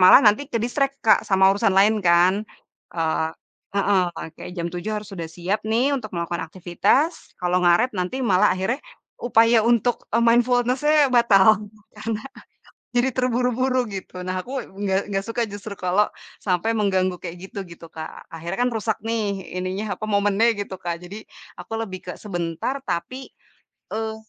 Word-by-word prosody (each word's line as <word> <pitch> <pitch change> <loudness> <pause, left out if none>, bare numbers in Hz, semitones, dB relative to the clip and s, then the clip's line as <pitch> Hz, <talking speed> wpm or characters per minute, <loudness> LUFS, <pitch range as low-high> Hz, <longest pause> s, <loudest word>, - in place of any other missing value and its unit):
malah 185 +7 +9
nanti 215 +7 +4
ke-distract 270 +3 -1
Kak 220 - +6
sama 190 0 +5
urusan 195 -1 +1
lain 210 +3 +5
kan. 175 +2 +5 0.6
E 170 - -3 0.8
heeh, 200 -1 +3
eee, - - -5
kek - - -7
jam 170 0 -2
07:00 180 +4 -4
harus 210 - -13
sudah 170 -3 -5
siap 185 +4 -1
nih, 240 +6 +2
untuk 220 -5 -6
melakukan 170 0 -2
aktivitas 190 - 0
kalau 180 0 +2
ngaret 175 +9 +4
nanti 185 +9 -2
malah 190 -6 +4
akhirnya 190 +8 -1 0.4
upaya 230 -1 +4
untuk 240 0 +2
e 230 - +4
mindfulness-nya 250 +5 +3
batal, 215 -3 +6 0.4
karena 215 0 -3 0.8
jadi 245 +2 +3
terburu-buru 255 +1 +1 0.2
gitu. 185 -1 -7
Nah, 185 0 -2
aku 250 - -10 0.3
nggak 195 -1 +2
nggak 195 0 -1
suka 230 +1 -1
justru 205 0 -7
kalau 190 +4 +3 0.4
sampai 180 +3 +1
mengganggu 185 -3 +1
kayak 175 -1 -6
gitu, - - -7
gitu 170 0 -11
Kak. 160 0 -8
Akhirnya 165 +4 -5
kan - - +1
rusak 220 -1 -1
nih, 225 0 -1 0.4
ininya 185 +3 -3
apa 215 - -4
momennya 205 +2 +3
gitu 200 -1 -4
Kak. 170 -1 -4
Jadi 185 +3 -8 0.4
aku - - -10
lebih 190 -4 -5
ke 180 - -4
sebentar 175 - -3
tapi, 255 +11 -3 0.6
eee, 220 0 -2
205 Hz, 160 wpm, -23 LUFS, 185-235 Hz, 0.8 s, malah